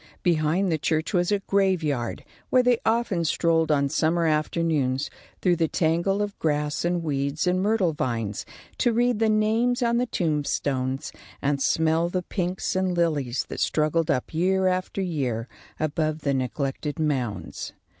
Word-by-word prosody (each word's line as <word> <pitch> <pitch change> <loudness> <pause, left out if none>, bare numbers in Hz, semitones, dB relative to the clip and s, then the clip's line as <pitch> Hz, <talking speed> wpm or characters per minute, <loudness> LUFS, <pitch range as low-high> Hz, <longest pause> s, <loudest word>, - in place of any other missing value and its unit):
Behind 170 +2 +2
the 160 - 0
church 160 +6 -1
was 175 +1 +2
a 205 -1 +1
graveyard, 175 - 0 0.2
where 255 -1 +4
they 245 -2 +3
often 225 -6 +1
strolled 165 0 +2
on 140 -2 +3
summer 165 +4 +1
afternoons, 150 -3 0 0.3
through 180 -2 +3
the 165 -1 +2
tangle 170 +5 +1
of 205 -1 -4
grass 150 -1 0
and 175 0 0
weeds 140 +1 -1
and 180 +1 +2
myrtle 200 -5 +2
vines, 115 -7 -2 0.4
to 240 -2 +3
read 240 -1 +2
the 225 -1 +3
names 225 +4 +2
on 235 0 +2
the 250 +1 +1
tombstones 145 - -1 0.3
and 140 0 0
smell 160 +3 +2
the 180 0 -2
pinks 180 0 -2
and 185 -1 0
lilies 145 -7 0
that - - -5
struggled 155 +1 +1
up 130 0 -1
year 190 +3 +2
after 185 +1 0
year 130 -10 -2 0.3
above 155 0 -1
the 140 -1 0
neglected 135 +2 -2
mounds. 135 -8 -2
165 Hz, 155 wpm, -25 LUFS, 145-190 Hz, 0.4 s, where